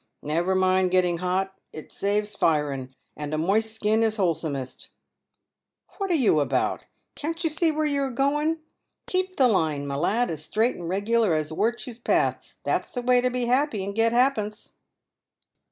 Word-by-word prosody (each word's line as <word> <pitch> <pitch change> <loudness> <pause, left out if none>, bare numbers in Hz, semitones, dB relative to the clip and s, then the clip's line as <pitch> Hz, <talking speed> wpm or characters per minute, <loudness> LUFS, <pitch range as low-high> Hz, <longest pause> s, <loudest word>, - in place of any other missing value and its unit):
Never 170 +5 0
mind 185 0 +3
getting 180 -2 +2
hot, 185 +2 -1 0.2
it 155 - -10
saves 205 +1 -1
firen, 140 -7 0 0.2
and 150 0 -4
a - - -1
moist 215 +7 +1
skin 220 +1 +1
is 220 -1 +2
wholesomest. 155 -8 -2 1.1
"What 390 -1 -1
are 350 - +3
you 230 - +3
about? 145 - 0 0.3
Can't 330 +3 -4
you 325 - +1
see 320 +1 +2
where 310 0 -1
you're 280 -2 +1
a - - -6
goen. 295 +5 0 0.4
Keep 370 0 -1
the 260 - +5
line, 155 -9 +1
my 140 - -4
lad, 205 +11 +1
as 155 -2 -4
straight 220 +8 +1
and 170 -1 -6
regular 205 0 +2
as 155 0 -2
wirtue's 235 +5 -2
path, - - +1 0.2
that's - - -1
the 245 - -3
way 250 0 +4
to 250 - +1
be 250 -1 -1
happy 250 -4 +1
and 200 +1 -4
get 225 +2 +2
ha'pence." 235 -4 0
210 Hz, 170 wpm, -25 LUFS, 170-250 Hz, 1.1 s, the